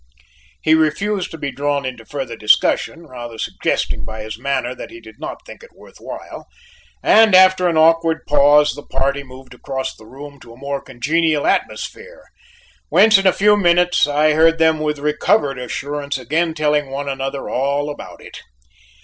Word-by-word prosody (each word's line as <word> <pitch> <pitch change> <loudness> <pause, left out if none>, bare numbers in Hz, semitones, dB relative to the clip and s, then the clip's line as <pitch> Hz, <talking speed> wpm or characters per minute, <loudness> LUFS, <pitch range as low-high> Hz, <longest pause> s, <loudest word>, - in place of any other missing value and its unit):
He 155 - +3
refused 185 +6 0
to 160 - -9
be 140 -2 -4
drawn 145 0 -2
into 120 -3 -7
further 135 -5 -5
discussion, 110 +9 +1
rather 120 -5 -9
suggesting - - -2
by 110 0 -7
his 110 0 -6
manner 125 +1 -2
that - - -9
he 345 +1 -12
did - - -16
not - - -8
think - - -12
it 485 - -17
worth - - -17
while; - - -9 0.6
and 220 -3 +5
after 185 -1 +5
an 165 - -1
awkward 165 0 +3
pause, 145 +1 +4
the - - -9
party 140 +1 -2
moved 130 -1 -14
across 130 -1 -5
the 110 - -17
room 140 +2 -11
to 115 -2 -14
a - - -17
more 140 +1 -4
congenial 150 +4 -1
atmosphere, - - -3 0.7
whence 215 -2 +5
in 195 - +1
a - - +6
few 210 +3 +3
minutes 175 -4 +3
I 150 +1 +2
heard 165 +1 +4
them 160 -1 +2
with 150 -1 -2
recovered 150 0 0
assurance 140 +3 -4
again 160 +6 -1
telling 150 -2 0
one 140 +1 -5
another 135 0 -4
all 140 +3 -1
about - - -11
it. - - -11
145 Hz, 175 wpm, -18 LUFS, 135-165 Hz, 0.7 s, a